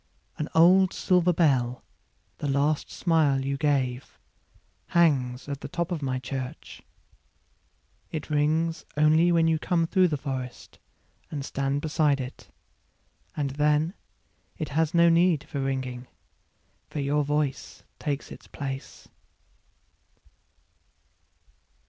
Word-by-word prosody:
An 150 - -2
old 185 +3 +6
silver 180 -1 +2
bell, 130 -8 +1 0.6
the 145 - -3
last 145 +2 +1
smile 150 -6 +1
you 140 0 -1
gave, 135 -4 -1 0.7
Hangs 135 -7 +2
at 140 -1 -5
the - - -5
top 170 0 -3
of 165 -4 -2
my 130 -2 -1
church.It 135 +3 -10
rings 155 +3 +1
only 155 +3 +4
when 165 -1 +3
you 160 -1 +2
come 165 0 +1
through 185 +2 +3
the 155 -3 -1
forestAnd 135 +1 -8
stand 140 +1 -2
beside 150 -2 +1
it. 130 0 -8 0.9
And 140 -2 -1
then, 150 +4 +1 0.6
it 155 - -4
has 160 +2 0
no 170 0 +6
need 170 -2 +3
for 140 - -5
ringing, 130 -2 -3 0.8
For 150 - -5
your 145 +1 +1
voice 145 -1 -2 0.2
takes 145 -2 -3
its - - -11
place. 135 -2 -7
150 Hz, 110 wpm, -26 LUFS, 135-165 Hz, 0.9 s, old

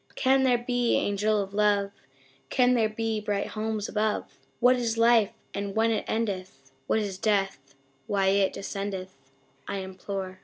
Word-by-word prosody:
Can 265 0 +3
there 255 -2 +4
be, 245 0 +1
Angel 210 +1 +1
of 195 -1 -4
Love 205 -1 +2 0.6
Can 250 -1 +3
there 225 -3 +2
be 220 0 -2
bright 205 -1 -2
homes 215 -1 -3
above 215 -1 -1 0.2
What 250 +1 +5
is 230 -2 -1
Life 230 -2 +5 0.2
and 200 0 -4
when 225 +1 +3
it 220 - -1
endeth 185 -11 -3 0.2
What - - +2
is 200 -3 -3
Death 195 -11 -1 0.3
why 195 -1 +2
it 195 0 +3
descendeth 195 -2 -5 0.5
I 200 - -3
implore? 190 0 -6
210 Hz, 155 wpm, -27 LUFS, 195-225 Hz, 0.6 s, What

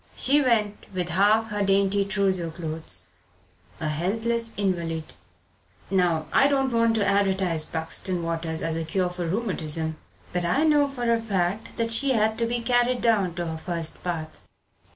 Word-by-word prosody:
She 285 +3 +4
went, 215 -6 0
with 180 -1 -2
half 210 +5 +3
her 205 0 -1
dainty 200 0 +3
trousseau 190 -3 0
clothes 160 - -6 0.7
a 160 - -2
helpless 225 +9 -1
invalid. 170 -5 -2 0.8
Now 175 -4 +2
I 275 - +5
don't 270 -3 +1
want 230 -1 +3
to 210 -2 +1
advertise 190 -5 +1
Buxton 170 +2 -3
waters 165 -1 -3
as 165 0 -1
a 165 - -2
cure 180 +2 0
for 180 -1 -4
rheumatism, 160 -6 -2 0.4
but 180 0 0
I 180 - +2
know 295 -2 +4
for 245 -4 0
a 230 - 0
fact 200 -1 -2
that 230 0 -1
she 265 +4 +3
had 220 -1 +2
to 230 - +1
be 240 0 -1
carried 245 +1 +2
down 205 -7 +2
to 175 -1 -3
her 160 -1 -4
first 165 0 -4
bath. 165 -3 -4
195 Hz, 165 wpm, -25 LUFS, 165-230 Hz, 0.8 s, I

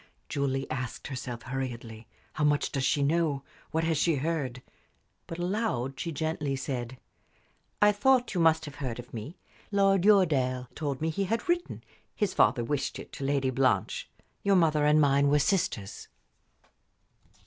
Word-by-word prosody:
Julie 135 -1 -1
asked 130 -1 -4
herself, 125 -3 -5
hurriedly: 120 -4 -5 0.3
"How 155 - -2
much 145 -1 +2
does 135 - -1
she 145 +2 +2
know? 150 -2 +1 0.3
What 160 +1 0
has 160 -2 +1
she 165 -1 +3
heard?" 135 -4 -2 0.6
But 165 - -6
aloud 175 - -2
she 170 - -3
gently 150 -2 -2
said: 130 -2 -4 0.9
"I 210 - +7
thought 250 +4 +2
you 180 - +1
must 160 -1 +4
have 145 - -9
heard 130 -5 -4
of 120 0 -10
me. 120 +10 -7 0.3
Lord 195 -2 +3
Uredale 135 -11 +3
told 145 -3 -3
me 160 0 0
he 195 +5 -1
had 225 +4 -2
written 345 0 -1 0.3
his 205 -4 0
father 120 +3 +3
wished 140 +3 -2
it - - -10
to - - -6
Lady 135 -1 +1
Blanche. 130 -7 0 0.3
Your 200 -1 +3
mother 155 -4 +3
and 150 +1 +5
mine 140 -1 +4
were 145 - +4
sisters." 140 - -1
145 Hz, 160 wpm, -29 LUFS, 130-165 Hz, 0.9 s, I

